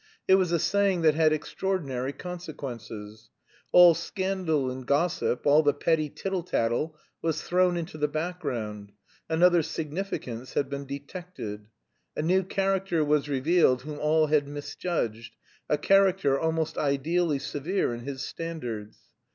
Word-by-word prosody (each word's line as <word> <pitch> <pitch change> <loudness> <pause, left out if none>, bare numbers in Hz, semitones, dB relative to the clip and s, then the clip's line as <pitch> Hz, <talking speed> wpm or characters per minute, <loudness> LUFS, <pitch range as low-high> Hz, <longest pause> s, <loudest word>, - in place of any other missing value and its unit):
It - - +6
was 185 -2 +4
a 170 - +3
saying 195 0 +1
that 155 -1 +5
had 155 0 +3
extraordinary 150 -5 -2
consequences. 125 - -8 0.4
All 175 -1 +9
scandal 170 -5 -1
and 130 0 -6
gossip, 140 -1 0
all 145 +2 +6
the 145 -2 +2
petty 155 0 +1
tittle 190 +4 -3
tattle 150 0 -1 0.2
was 160 -2 -1
thrown 180 0 +2
into 160 -2 -5
the 150 - +2
background, 135 - -4 0.4
another 175 +1 +5
significance 155 -6 -5
had 140 -1 0
been 140 0 -5
detected. 140 - -7 0.5
A - - -2
new 185 +4 +3
character 190 -3 0
was 150 0 +1
revealed 140 -1 +3
whom 150 0 -6
all 155 +1 +3
had 150 -2 +2
misjudged; 145 -5 -4 0.3
a 150 - +3
character, 190 -4 +3
almost 160 -1 -1
ideally 150 +3 +1
severe 145 +3 -2
in 120 - -5
his 135 +2 -5
standards. 120 -12 -6
155 Hz, 135 wpm, -27 LUFS, 135-175 Hz, 0.5 s, All